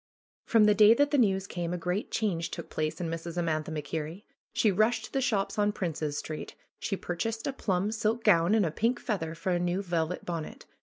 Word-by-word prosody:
From 225 -3 +4
the 210 - +6
day 210 +2 +7
that 285 +3 +2
the 290 - +3
news 195 -4 +2
came 175 -2 -3
a - - -3
great 180 +4 -2
change 175 -7 -1
took - - -7
place 155 0 -2
in 175 - -2
Mrs. 165 +1 -5
Amantha 160 -3 -1
MacKerrie. 155 +4 -4 0.3
She 215 - +3
rushed 215 +5 +2
to - - -13
the 270 - +1
shops 210 -5 0
on 205 0 +3
Princes 155 -7 -3
Street. 155 0 -6 0.2
She 195 - -2
purchased 225 +7 -3
a 275 - -1
plum 195 -4 0
silk 220 +1 0
gown 175 0 +5
and 210 -4 +3
a 160 - -1
pink 235 +8 0
feather 165 -7 -3
for 165 +3 -2
a 175 - +2
new 180 +3 0
velvet 170 -1 -2
bonnet. 165 -3 -5
180 Hz, 215 wpm, -29 LUFS, 165-215 Hz, 0.3 s, day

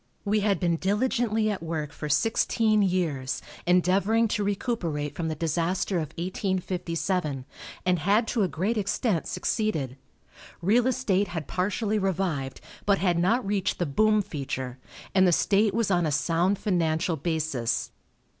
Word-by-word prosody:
We 210 +1 +2
had 205 -1 +1
been 170 -2 +1
diligently 220 +3 +1
at 200 - -4
work 160 -3 -3
for 150 +1 -6
sixteen 220 +3 +2
years, 165 -9 0 0.3
endeavoring 190 +6 +3
to 210 -1 0
recuperate 185 - -2
from 165 - -2
the 160 - -2
disaster 170 +4 0
of 155 -4 -2
1857, 180 -5 -2 0.4
and 180 -1 +2
had 205 +8 +2
to 235 - 0
a 195 - +3
great 190 +8 -1
extent 200 -2 0
succeeded. 155 - -1 0.6
Real 225 +8 +3
estate 210 -6 +1
had 165 -4 -5
partially 205 +3 0
revived, 175 -9 -2 0.3
but 200 -1 +4
had 180 -3 +1
not 215 +7 +2
reached 200 -1 0
the 175 - 0
boom 215 +8 +3
feature, 130 -5 -5 0.3
and 190 -1 +5
the - - +4
state 205 +4 +3
was 225 -3 +1
on 175 -3 +2
a - - 0
sound 165 +6 +1
financial 170 -3 0
basis. 155 -6 -1
185 Hz, 145 wpm, -27 LUFS, 160-205 Hz, 0.6 s, and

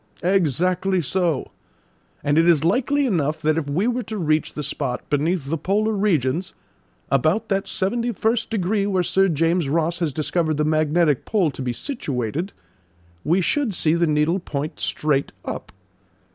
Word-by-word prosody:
"Exactly 185 +1 +1
so; 170 -2 -1 0.7
and 145 +2 +3
it 165 +1 +4
is 155 -4 +4
likely 275 +9 +2
enough 155 - 0
that 155 0 +3
if 155 -3 -2
we 175 +9 0
were 245 +1 0
to 220 -2 -6
reach 155 -4 0
the 150 - -3
spot 135 -2 -3
beneath 150 +1 0
the 160 +2 -2
polar 210 +5 +1
regions, 180 -5 0 0.6
about 160 - +2
that 195 -1 0
seventy 235 +5 -1
first 225 +2 0
degree 200 -1 0
where 190 -3 +1
Sir 195 +2 +3
James 165 0 +1
Ross 165 +3 0
has 165 -4 0
discovered 155 +2 -1
the 150 - +1
magnetic 155 -1 +2
pole 190 -8 +1
to 135 - -8
be 125 -1 -1
situated, 145 - -3 0.7
we 175 +4 +2
should 235 +1 0
see 155 -1 +2
the 170 0 +2
needle 155 +4 +2
point 150 -3 -5
straight 145 -2 0
up. - - -6
170 Hz, 160 wpm, -22 LUFS, 150-195 Hz, 0.7 s, it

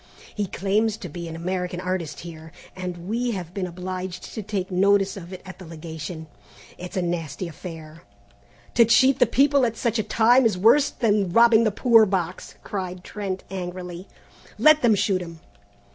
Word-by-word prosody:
He 205 -2 -2
claims 205 +4 0
to 185 - -7
be 170 +2 -7
an 165 - -7
American 180 +1 -3
artist 180 -5 -3
here, 160 -2 -10 0.2
and 180 -2 -6
we 235 +3 -1
have 180 -3 -6
been 185 -2 -3
obliged 185 +1 -6
to 220 - -4
take 195 -2 -4
notice 195 +1 +3
of 180 -2 -9
it 185 -1 -9
at 190 -1 -10
the 185 - -10
Legation. 160 0 -7 0.5
It's 180 +2 -7
a 185 - +1
nasty 170 -1 -3
affair." 160 -1 -10 0.7
"To 235 - +6
cheat 260 +4 +4
the 250 - +5
people 280 +3 +3
at 230 -2 0
such 235 -2 0
a - - +1
time 240 +5 +4
is 220 -5 +2
worse 275 +9 +5
than 210 -7 +1
robbing 230 +2 +5
the 215 - +2
poor 225 +1 +5
box," 185 -2 -3
cried 185 -2 -5
Trent 195 -2 -5
angrily. 180 -1 -6 0.5
"Let 310 0 +6
them 230 -3 +4
shoot 190 -2 +1
him!" 165 -2 -9
185 Hz, 175 wpm, -24 LUFS, 175-220 Hz, 0.7 s, To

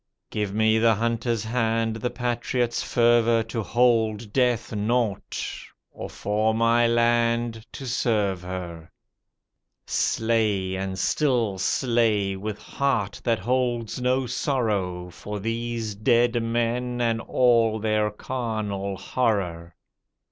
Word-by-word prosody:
Give 105 -2 -2
me 110 +1 +3
the 115 0 +4
hunter's 115 +1 -1
hand, 115 -1 0
the 125 +2 -2
patriot's 120 0 -1
fervour 115 -1 +3
To 115 +1 -4
hold 110 -2 +1
death 125 -3 +1
naught, 110 -1 -1 0.5
or - - -7
for 110 +2 0
my 115 +1 +3
land 115 -1 +1
to 135 - -7
serve 105 -7 0
her. 90 -3 -7 1.0
Slay 110 -5 0
and 95 0 -3
still 115 -2 +1
slay, 110 -6 +1
with 105 +2 -5
heart 125 -8 -2
that 115 -2 +2
holds 120 +1 -1
no 130 +1 +1
sorrow 100 -10 -1
For 105 +4 -6
these 115 0 -3
dead 120 +3 +2
men 120 +2 -1
and 115 -1 +1
all 115 -3 +3
their 110 -1 +1
carnal 105 -4 -3
horror. 90 -10 -1
115 Hz, 110 wpm, -25 LUFS, 105-120 Hz, 1.0 s, the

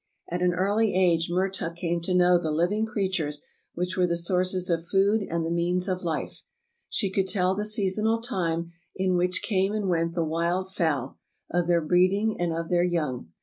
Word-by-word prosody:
At 175 +1 -2
an 180 -1 +2
early 200 +3 +1
age 170 -3 +3
Mertuk 185 -1 -1
came 170 -1 -2
to 180 +2 -1
know 180 0 +5
the 165 -2 -3
living 180 +8 +1
creatures 185 -8 -2 0.3
which 180 +1 -2
w^ere 180 -1 +2
the 170 0 0
sources 185 +1 0
of 170 -2 -1
food 200 +3 +3
and 170 -4 -2
the 165 - -2
means 175 +2 0
of 185 -1 -1
life. 165 -3 -3 0.5
She 195 -4 -1
could 190 0 0
tell 185 -1 +1
the 210 +2 -2
seasonal 215 +1 +1
time 170 -7 -2 0.2
in 185 -1 +1
which 180 +1 0
came 195 -1 +1
and 210 -2 -1
went 165 -1 0
the 170 -2 0
wild 170 +4 -1
fowl, 155 -9 -1 0.3
of 175 0 +1
their 170 -1 +3
breeding 185 +6 +2
and 175 -1 0
of 165 0 -3
their 175 -1 +3
young. 150 - -1
180 Hz, 190 wpm, -26 LUFS, 170-190 Hz, 0.5 s, know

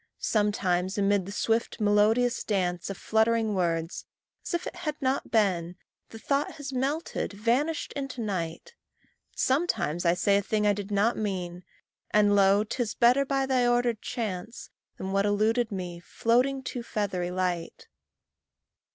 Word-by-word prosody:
Sometimes 190 -3 0
amid 200 -2 +2
the - - -6
swift 225 +3 -1
melodious 215 +4 +3
dance 180 -4 -1
Of 195 - -5
fluttering 220 0 +1
words 165 -3 -1 0.4
as - - -2
if 345 - -3
it - - -6
had 305 -4 -4
not 265 -1 -1
been, 185 -6 +1 0.3
The 225 - -10
thought 280 +5 -1
has 285 -3 -7
melted, 275 0 -2
vanished 245 +10 0
into 275 -3 -5
night; 195 - -4 0.6
Sometimes 225 - 0
I 170 0 +3
say 200 +3 +3
a - - +1
thing 210 +1 0
I 205 - +4
did 200 0 -6
not 205 +3 +2
mean, 180 -4 -3 0.5
And 205 -1 +4
lo! 200 +1 +5
'tis 225 0 -3
better, 250 +4 +4
by 270 0 0
thy 255 -2 +2
ordered 240 -2 +1
chance, 220 0 -5 0.3
Than 190 - -4
what 195 +1 +2
eluded 220 +3 +1
me, 180 -3 -5
floating 250 +8 +1
too 250 -1 -4
feathery 200 -6 -2
light. 180 -2 -3
210 Hz, 150 wpm, -27 LUFS, 190-245 Hz, 0.6 s, lo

